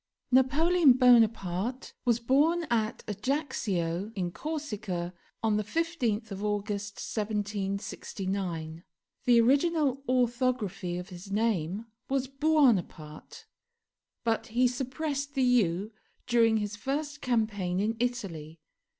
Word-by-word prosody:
NAPOLEON 285 +4 +5
BONAPARTE 230 -2 +3
was 235 -1 +3
born 295 +8 +3
at 220 -2 0
Ajaccio, 205 - -2
in 180 -3 -2
Corsica, 210 - -4 0.3
on 215 -2 +2
the 210 - 0
15th 235 - -1
of 195 +1 -5
August 205 -1 -2
1769; 195 -5 -3 0.4
the 240 -2 +6
original 280 +2 +2
orthography 245 -7 0
of 180 0 -7
his 185 +2 -10
name 205 -2 0 0.2
was 270 -1 +1
Buonaparte, 255 - 0 0.8
but 225 -1 0
he 245 +2 +3
suppressed 280 +3 -3
the 265 - +2
u 210 -5 +2 0.3
during 230 -2 +4
his 210 -1 -3
first 285 +5 -3
campaign 210 -7 0
in 215 +3 0
Italy. 180 -11 -3
225 Hz, 105 wpm, -29 LUFS, 195-260 Hz, 0.8 s, the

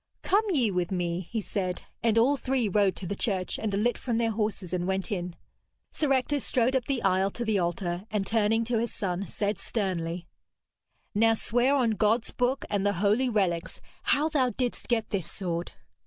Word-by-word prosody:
'Come 415 +3 +3
ye 255 - +2
with 180 -2 0
me,' 175 -1 -2
he 225 -2 -1
said, 185 -3 -3 0.2
and 230 -1 +2
all 255 +5 +5
three 260 -4 0
rode 200 -1 +2
to 190 - -7
the 200 - -3
church, 190 -3 -1
and 220 - -1
alit 215 +5 +1
from 235 -3 -1
their 230 -1 +1
horses 210 -4 -2
and 180 0 -1
went 190 +3 -1
in. 180 -3 -3 0.6
Sir 300 -3 0
Ector 270 +2 +2
strode 255 0 +1
up 255 -3 +1
the 270 -4 -1
aisle 190 0 +3
to 235 +4 -4
the 215 -3 +2
altar, 175 +1 -2
and 210 -2 -1
turning 225 +1 +2
to 230 0 0
his 235 0 -1
son, 190 0 -3
said 205 -1 -2
sternly: 180 -5 -2 0.9
'Now, 225 +2 +4
swear 245 +5 +2
on 245 -5 +3
God's 220 +2 +2
book 250 +2 0
and 200 -2 0
the 205 0 +2
holy 210 +7 +2
relics 185 -6 0 0.3
how 295 +2 +3
thou 280 -5 +2
didst 245 0 -3
get 230 -2 0
this 185 -5 -2
sword.' 175 -3 -3
210 Hz, 195 wpm, -28 LUFS, 185-240 Hz, 0.9 s, all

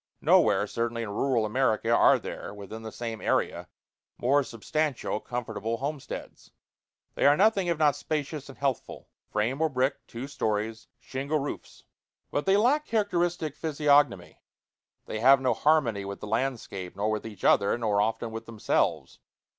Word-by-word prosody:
Nowhere, 100 0 +4
certainly, 115 +2 -2
in 105 - -5
rural 120 +1 +1
America, 115 -1 +1
are - - +6
there, 105 - -7
within 105 +2 -8
the 110 0 -7
same 115 -2 -5
area, - - 0 0.5
more 140 +4 +3
substantial, 130 +1 -2
comfortable 115 -2 -4
homesteads. 140 +2 -6 0.6
They - - +3
are 145 +1 +5
nothing 200 -2 +3
if 170 -2 +1
not 150 -2 +3
spacious 150 -1 -4
and 135 - -11
healthful, 135 -4 -3 0.2
frame 115 +8 -1
or 160 - +3
brick, 135 0 0
two 120 +3 -6
stories, 110 -3 -2
shingle 140 +4 -2
roofs. 145 0 -6 0.5
But 145 - -2
they 195 +1 +5
lack 275 +8 +2
characteristic 175 -8 0
physiognomy; 145 - +2 0.6
they 110 - -4
have 135 +4 +6
no 130 -1 +1
harmony 135 -10 +2
with 100 0 -6
the - - -7
landscape, 110 -6 -3
nor 105 +2 0
with 110 -1 -2
each 105 -4 -10
other, 100 +3 +4
nor 105 -3 +1
often 110 +2 -1
with 115 0 -7
themselves. 115 -2 -1
125 Hz, 155 wpm, -27 LUFS, 110-145 Hz, 0.6 s, are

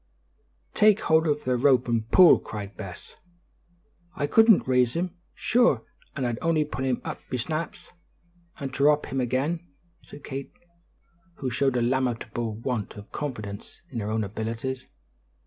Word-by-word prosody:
"Take 215 -1 +5
hold 160 0 +3
of 150 -1 0
the 125 0 +1
rope 130 -1 +4
and 115 -1 -1
pull," 180 -3 +7
cried 105 0 -7
Bess. 95 -5 -9 1.0
"I 145 - -1
couldn't 225 - +5
rise 125 -2 +2
him; 180 +2 -2 0.2
shure 230 - +3 0.3
an' 135 - -2
I'd 120 -1 -2
only 160 -2 +2
pull 135 -3 -5
him 130 -2 0
up - - -4
be 125 - -1
snaps, 155 +6 -4 0.7
and 135 -2 -4
dhrop 145 +2 +3
him 135 0 0
again," 135 +7 0 0.4
said 145 - -13
Kate, 135 0 -6 0.8
who 130 -2 -4
showed 135 0 +1
a 120 - +1
lamentable 120 -3 -1
want 115 -2 -3
of 105 0 -11
confidence 110 -9 -6
in 120 - -3
her 105 -1 -3
own 110 0 0
abilities. 115 +5 -4
130 Hz, 150 wpm, -26 LUFS, 115-150 Hz, 1.0 s, pull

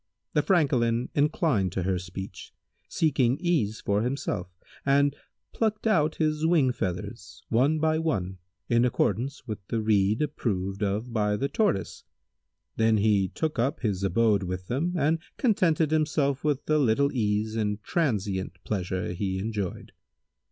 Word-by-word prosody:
The 150 - +3
Francolin 125 -9 +2
inclined 145 - +1
to 95 - -1
her 95 0 0
speech, 90 +1 -8 0.3
seeking 135 -5 +2
ease 150 - 0
for 100 +1 +1
himself, 115 -7 -2 0.3
and 140 +1 +3 0.4
plucked 215 -1 -1
out 160 -8 +2
his 155 -1 0
wing 160 -6 +4
feathers, 90 -2 -5
one 135 +7 +3
by 155 0 +1
one, 95 - -2 0.3
in 120 0 +3
accordance 125 +3 0
with 110 -4 -5
the 115 - -1
rede 105 +2 +2
approved 100 -9 -2
of 105 +4 -1
by 105 -2 +1
the 140 - 0
Tortoise; 150 - -1 0.7
then 110 -1 +3
he 100 -2 +3
took 155 - -3
up 135 +6 0
his 100 -5 -1
abode 105 +2 +3
with 90 0 -4
them 165 +9 -1
and 155 +2 +2 0.2
contented 170 - +2
himself 150 -3 +1
with 150 -3 0
the 155 0 +2
little 140 +2 +2
ease 110 -2 0
and 105 -2 -1
transient 100 - -1
pleasure 95 -3 -2
he 95 +1 -2
enjoyed. 100 -2 -4
115 Hz, 145 wpm, -27 LUFS, 100-150 Hz, 0.7 s, wing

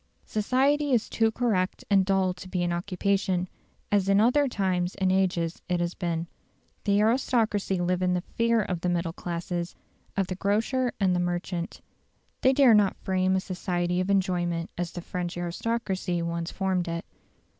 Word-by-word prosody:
Society 270 +6 +1
is 230 -3 +2
too 225 -1 +2
correct 215 -6 0
and 195 -2 +4
dull 190 -1 +2
to 180 +1 -11
be 180 -1 -1
an 175 0 0
occupation, 185 +1 0 0.4
as 200 -1 +2
in 195 0 +5
other 250 +6 +4
times 185 -6 -1
and 190 -1 +1
ages 180 -3 0
it 180 -1 +1
has 175 0 -1
been. 170 -2 -2 0.6
The 200 -1 +3
aristocracy 220 -4 +1
live 180 +1 0
in 180 0 +2
the 180 - 0
fear 230 -1 +2
of 180 -3 -3
the 180 - 0
middle 170 -1 -1
classes 175 0 -4 0.4
of 195 - +2
the 185 - -4
grocer 225 +7 0
and 185 -3 +3
the - - +1
merchant. 175 0 -3 0.6
They 260 - +5
dare 265 -3 +6
not 205 -2 +4
frame 185 0 +1
a - - +3
society 180 -2 -2
of 185 - -2
enjoyment 175 -3 0
as 175 -1 -3
the 175 - -6
French 175 0 -4
aristocracy 185 -1 -2
once 170 0 -3
formed 190 -3 -1
it. 170 0 -3
185 Hz, 170 wpm, -27 LUFS, 175-205 Hz, 0.6 s, dare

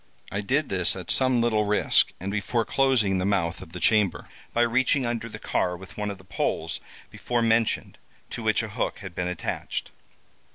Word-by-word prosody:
I 100 +3 -2
did 140 +8 0
this 90 -2 +4
at 95 -3 -2
some 130 -2 +4
little 110 -2 +2
risk, 105 0 +3
and 95 +2 -4
before 110 +3 -1
closing 120 -9 +2
the - - -1
mouth 95 -4 0
of 80 - -11
the 90 - -7
chamber, 105 +1 +2 0.2
by 120 - +2
reaching 130 +3 +2
under 115 -1 -3
the - - -8
car 90 -1 -1
with 95 +1 -13
one 105 -1 -3
of 100 - -5
the 95 - -17
poles 95 - -2 0.3
before 120 -1 -1
mentioned 115 0 +1 0.3
to - - -5
which - - +2
a - - -5
hook - - -2
had 95 - -7
been 90 0 -2
attached. 90 -2 -4
105 Hz, 195 wpm, -26 LUFS, 95-120 Hz, 0.3 s, this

